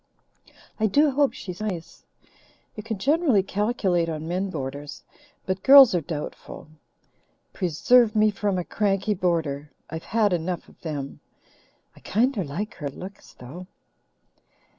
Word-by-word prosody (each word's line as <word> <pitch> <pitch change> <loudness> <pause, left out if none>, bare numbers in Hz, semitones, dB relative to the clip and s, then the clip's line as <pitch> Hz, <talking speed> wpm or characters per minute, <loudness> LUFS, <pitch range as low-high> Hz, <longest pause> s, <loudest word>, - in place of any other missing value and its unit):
"I 220 - +3
do 290 +8 +3
hope 280 +1 +2
she's 180 0 -8
nice. 185 -6 -6 0.7
You 210 - -6
can 220 0 -4
generally 275 - +2
calculate 195 -4 0
on 155 0 -5
men 185 +3 -2
boarders, 145 -2 -6 0.4
but 185 0 -2
girls 275 -4 +9
are 175 - +1
doubtful. 150 0 -7 0.8
Preserve 215 +7 +3
me 215 0 +4
from 200 -1 -1
a 180 - -1
cranky 200 +2 0
boarder! 160 -6 -1 0.2
I've 160 0 -6
had 215 -2 +1
enough 175 +1 -3
of - - -21
them. 145 -4 -5 0.8
I - - -16
kinder 230 -1 0
like 170 +9 -5
her 145 -4 -4
looks, 190 +8 -11
though." 165 +9 -10
185 Hz, 135 wpm, -25 LUFS, 165-215 Hz, 0.8 s, girls